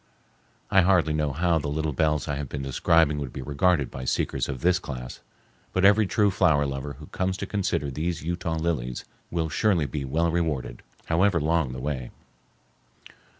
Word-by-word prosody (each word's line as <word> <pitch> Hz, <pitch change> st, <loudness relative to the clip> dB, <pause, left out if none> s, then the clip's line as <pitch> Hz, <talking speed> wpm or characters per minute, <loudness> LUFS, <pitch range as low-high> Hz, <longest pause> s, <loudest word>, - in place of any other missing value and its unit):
I 95 Hz, -, +6 dB
hardly 90 Hz, -4 st, +3 dB
know 75 Hz, -2 st, 0 dB
how 85 Hz, +3 st, +1 dB
the 75 Hz, -, -4 dB
little 75 Hz, +1 st, -1 dB
bells 75 Hz, +1 st, +1 dB
I 75 Hz, -2 st, -2 dB
have 70 Hz, -2 st, -5 dB
been 70 Hz, -2 st, -4 dB
describing 75 Hz, +2 st, +2 dB
would 70 Hz, -4 st, -4 dB
be 65 Hz, -, -6 dB
regarded 70 Hz, +1 st, +1 dB
by 65 Hz, -, -6 dB
seekers -, -, -1 dB
of 65 Hz, -3 st, -4 dB
this 90 Hz, 0 st, +3 dB
class, 60 Hz, -7 st, -7 dB, 0.5 s
but 95 Hz, +1 st, +2 dB
every 105 Hz, +1 st, +5 dB
true 105 Hz, 0 st, +2 dB
flower 75 Hz, -5 st, +3 dB
lover 70 Hz, +1 st, -4 dB
who 75 Hz, +3 st, -12 dB
comes 95 Hz, +4 st, -2 dB
to 100 Hz, -, -4 dB
consider 95 Hz, -8 st, -1 dB
these 80 Hz, +4 st, -3 dB
Utah 85 Hz, 0 st, -2 dB
lilies 80 Hz, -7 st, -2 dB, 0.2 s
will 85 Hz, -2 st, -1 dB
surely 85 Hz, +1 st, +2 dB
be 70 Hz, +1 st, -4 dB
well 80 Hz, +5 st, 0 dB
rewarded, 80 Hz, -8 st, -2 dB, 0.2 s
however 90 Hz, +2 st, +2 dB
long 80 Hz, -3 st, +1 dB
the 65 Hz, -, -6 dB
way. 65 Hz, -2 st, -3 dB
80 Hz, 180 wpm, -26 LUFS, 70-85 Hz, 0.5 s, I